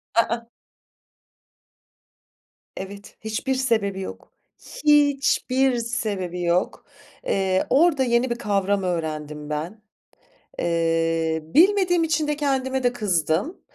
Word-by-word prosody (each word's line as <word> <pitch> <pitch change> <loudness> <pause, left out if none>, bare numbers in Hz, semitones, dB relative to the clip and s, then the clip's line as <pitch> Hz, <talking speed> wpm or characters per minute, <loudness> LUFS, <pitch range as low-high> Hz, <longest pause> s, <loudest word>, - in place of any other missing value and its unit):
I 230 - +7
ıh. 235 +1 -1 2.3
Evet, 200 +1 -9
hiçbir 220 +5 -2
sebebi 220 -7 0
yok. 190 - -8 0.5
Hiçbir 275 -3 +3
sebebi 210 -7 -3
yok. 175 +1 0 0.4
Eee, 190 - +1
orada 295 -2 +4
yeni 240 +1 +2
bir 235 - -1
kavram 200 -3 0
öğrendim 155 -4 -4
ben. 165 +9 -4 0.8
Eee, 165 -1 0
bilmediğim 355 - +3
için 310 -1 0
de 300 - 0
kendime 265 -2 -1
de 245 -1 +2
kızdım. 190 - -1
215 Hz, 100 wpm, -23 LUFS, 175-265 Hz, 2.3 s, I